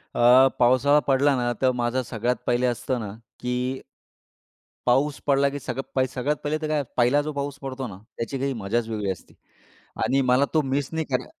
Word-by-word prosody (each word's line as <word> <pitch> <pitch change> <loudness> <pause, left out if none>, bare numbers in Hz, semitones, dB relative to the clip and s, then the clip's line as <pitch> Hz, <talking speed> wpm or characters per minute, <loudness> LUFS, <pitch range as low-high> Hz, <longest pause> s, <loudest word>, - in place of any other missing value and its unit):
अ, 125 +2 +7
पावसाळा 130 +4 +5
पडला 140 +1 +3
ना, 120 -1 0
तर 130 -1 +4
माझं 120 +1 0
सगळ्यात 120 +1 -1
पहिले 120 +1 +2
असतं 125 +1 -1
ना 105 -3 -5 0.3
की 125 0 -2 1.3
पाऊस 135 +4 +2
पडला, 140 0 +4
की 145 +1 -5
सगळ 135 0 -2
सगळ्यात 140 +4 0
पहिले 150 +1 0
तर 155 - -2
काय? 150 -1 0
पहिला 125 +4 +4
जो 155 +1 -4
पाऊस 140 0 -4
पडतो 135 -1 -5
ना, 95 -5 -9 0.2
त्याची 115 +4 -3
काही 135 0 -1
मजाच 110 +1 -2
वेगळी 105 -3 -2
असते. 90 - -10 0.7
आणि 135 +4 +2
मला 130 +2 +3
तो 155 - +4
मिस 135 0 -1
नाही 160 -1 -1
करा 125 0 0
130 Hz, 185 wpm, -24 LUFS, 120-140 Hz, 1.3 s, अ